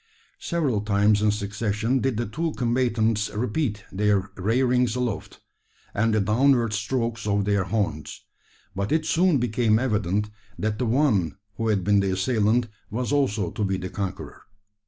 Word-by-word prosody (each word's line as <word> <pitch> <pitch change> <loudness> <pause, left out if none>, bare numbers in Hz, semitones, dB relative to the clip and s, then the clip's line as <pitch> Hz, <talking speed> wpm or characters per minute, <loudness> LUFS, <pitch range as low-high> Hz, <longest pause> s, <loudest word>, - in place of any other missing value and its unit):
Several 145 - 0
times 105 0 +2
in 105 - +3
succession 105 +4 -1
did 130 -3 -1
the 120 - -1
two 160 +9 -3
combatants 115 -3 +1
repeat 110 -1 -2
their 100 -1 +1
rearings 125 +4 +1
aloft, 125 -5 -3 0.5
and 115 +2 +1
the 110 - +2
downward 115 +2 +3
strokes 115 +1 -2
of 100 -1 +1
their 100 -2 +1
horns; 75 -8 -2 0.5
but 100 +1 -2
it 160 0 +1
soon 170 0 +3
became 115 -2 +2
evident, 105 -4 0 0.3
that 105 0 -2
the 125 - 0
one 110 - +2 0.2
who 115 - -1
had 105 -4 +1
been 100 +2 +3
the 100 -1 +1
assailant 110 +4 +1 0.2
was 125 +4 -2
also 110 -11 +1
to 105 - -3
be 95 -1 0
the 95 0 -5
conqueror. 100 0 -5
110 Hz, 155 wpm, -25 LUFS, 100-125 Hz, 0.5 s, in